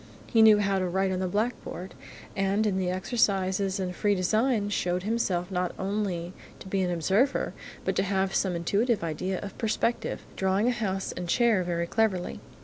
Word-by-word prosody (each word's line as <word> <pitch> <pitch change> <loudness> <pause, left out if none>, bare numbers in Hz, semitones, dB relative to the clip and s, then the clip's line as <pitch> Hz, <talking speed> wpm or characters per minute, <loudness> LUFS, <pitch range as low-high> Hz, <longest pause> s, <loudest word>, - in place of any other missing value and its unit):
He 225 - +3
knew 220 -1 +8
how 200 -2 +1
to 185 - 0
write 190 +2 0
on 185 - -1
the 185 - 0
blackboard, 200 -3 -3 0.4
and 195 +2 +1
in 195 -3 +1
the 180 -1 0
exercises 190 -1 +1
in 180 -1 -2
free 205 +3 +1
design 215 +5 +2
he 205 - -3
showed 180 -2 0
himself 195 -5 -1
not 180 -1 -1
only 190 -3 -2 0.2
to - - -11
be 190 0 0
an 180 - 0
observer, 195 - +1 0.3
but - - 0
to - - +4
have 195 0 0
some 185 -3 +1
intuitive 205 +5 +1
idea 180 +4 -2
of 200 - -7
perspective, 230 +1 -1
drawing 190 +4 +1
a - - +4
house 195 -5 -2
and 180 -1 -6
chair 230 -3 +3
very 170 -1 -1
cleverly. 195 -2 0
190 Hz, 185 wpm, -27 LUFS, 180-210 Hz, 0.4 s, knew